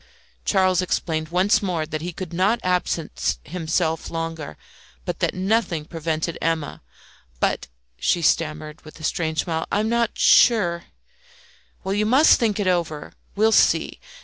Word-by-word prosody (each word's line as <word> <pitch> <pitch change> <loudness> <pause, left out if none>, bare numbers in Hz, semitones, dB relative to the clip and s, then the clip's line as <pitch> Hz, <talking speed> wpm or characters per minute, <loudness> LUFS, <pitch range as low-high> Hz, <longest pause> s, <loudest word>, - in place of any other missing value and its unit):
Charles 185 -2 +3
explained 160 -3 -2
once 185 +4 +2
more 175 -6 -1
that 155 -1 -5
he 175 +2 -4
could 175 0 -7
not 195 +7 +2
absent 180 -3 -1
himself 165 -1 -2
longer, 165 -2 -5 0.5
but - - -4
that - - 0
nothing 185 -4 0
prevented 160 0 -3
Emma 165 -2 -2 0.6
"But," - - 0 0.3
she 170 - +1
stammered, 155 -1 0
with 155 +1 -13
a - - -12
strange 160 -2 -1
smile, 160 -2 -3
"I 205 - +1
am 215 +1 0
not 235 -1 0
sure 175 -8 +4 0.5
" - - -30
"Well, 190 0 -2
you 210 +1 +1
must 270 +7 +5
think 220 -3 0
it 205 - 0
over. 170 -5 -1 0.2
We'll 220 +2 +3
see. - - +3
175 Hz, 150 wpm, -22 LUFS, 160-195 Hz, 0.6 s, must